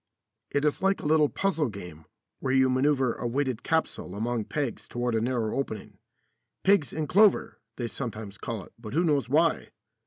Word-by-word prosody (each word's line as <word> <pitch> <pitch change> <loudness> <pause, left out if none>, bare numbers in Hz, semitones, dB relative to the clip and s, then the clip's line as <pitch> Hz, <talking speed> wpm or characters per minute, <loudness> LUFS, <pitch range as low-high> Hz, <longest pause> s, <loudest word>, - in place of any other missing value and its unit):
It 145 +1 0
is 150 - +1
like 195 +1 +2
a - - -8
little 150 -1 +4
puzzle 165 -8 0
game 90 -6 -9 0.3
where 130 - -1
you 130 -1 +4
manoeuvre 130 -1 +2
a 120 - -1
weighted 130 -1 -1
capsule 160 - -1
among 115 +1 -1
pegs 140 -6 -3
toward 120 0 -2
a 110 - +1
narrow 115 -2 -1
opening. 135 -5 -4 0.6
"Pigs 190 -10 +4
in 155 -1 -2
clover," 205 +6 +4 0.2
they 120 - -3
sometimes 110 -5 -6
call 110 -4 -4
it, - - -17
but 110 -1 -8
who 170 - +3
knows 145 -6 +1
why? 160 +4 +2
130 Hz, 180 wpm, -27 LUFS, 115-150 Hz, 0.6 s, little